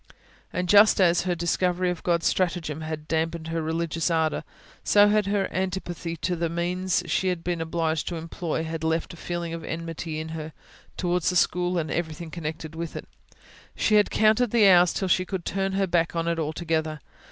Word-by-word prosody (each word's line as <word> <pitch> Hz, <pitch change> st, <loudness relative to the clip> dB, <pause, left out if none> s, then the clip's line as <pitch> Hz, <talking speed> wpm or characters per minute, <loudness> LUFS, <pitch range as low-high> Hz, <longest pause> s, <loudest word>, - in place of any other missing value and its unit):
And 180 Hz, 0 st, -2 dB
just 205 Hz, +3 st, +6 dB
as 175 Hz, -1 st, +4 dB
her 180 Hz, -1 st, 0 dB
discovery 180 Hz, +1 st, 0 dB
of 175 Hz, -, -6 dB
God's 170 Hz, -1 st, 0 dB
stratagem 165 Hz, -4 st, 0 dB
had 155 Hz, -1 st, -5 dB
damped 160 Hz, 0 st, -1 dB
her 165 Hz, 0 st, -1 dB
religious 165 Hz, +1 st, -1 dB
ardour, 160 Hz, -2 st, +1 dB, 0.4 s
so 205 Hz, 0 st, +5 dB
her 205 Hz, -2 st, +1 dB
antipathy 180 Hz, -3 st, -3 dB
to 180 Hz, -, 0 dB
the 170 Hz, 0 st, -1 dB
means 180 Hz, +2 st, -1 dB
she 175 Hz, +3 st, 0 dB
had 180 Hz, -2 st, -1 dB
been 175 Hz, -2 st, -2 dB
obliged 160 Hz, -1 st, -1 dB
to 175 Hz, -, -2 dB
employ 165 Hz, 0 st, -3 dB
had 160 Hz, 0 st, -5 dB
left 160 Hz, +1 st, -1 dB
a -, -, -9 dB
feeling 170 Hz, 0 st, -4 dB
of 165 Hz, -1 st, -6 dB
enmity 165 Hz, -1 st, -5 dB
in 160 Hz, 0 st, -5 dB
her, 160 Hz, -1 st, -6 dB, 0.4 s
towards 180 Hz, -1 st, +1 dB
the 180 Hz, -, -2 dB
school 180 Hz, 0 st, +2 dB
and 160 Hz, -2 st, -2 dB
everything 160 Hz, -1 st, -3 dB
connected 160 Hz, -1 st, -5 dB
with 165 Hz, 0 st, -5 dB
it: -, -, -7 dB, 0.7 s
she 215 Hz, -, +1 dB
had 210 Hz, -1 st, +5 dB
counted 220 Hz, +3 st, +3 dB
the 220 Hz, -2 st, +5 dB
hours 180 Hz, -2 st, +6 dB
till 190 Hz, -, -2 dB
she 185 Hz, 0 st, +3 dB
could 185 Hz, -2 st, -5 dB
turn 195 Hz, 0 st, -1 dB
her 195 Hz, 0 st, +1 dB
back 170 Hz, -2 st, 0 dB
on 165 Hz, 0 st, -1 dB
it 170 Hz, 0 st, 0 dB
altogether. 160 Hz, 0 st, -2 dB
170 Hz, 190 wpm, -25 LUFS, 160-180 Hz, 0.7 s, just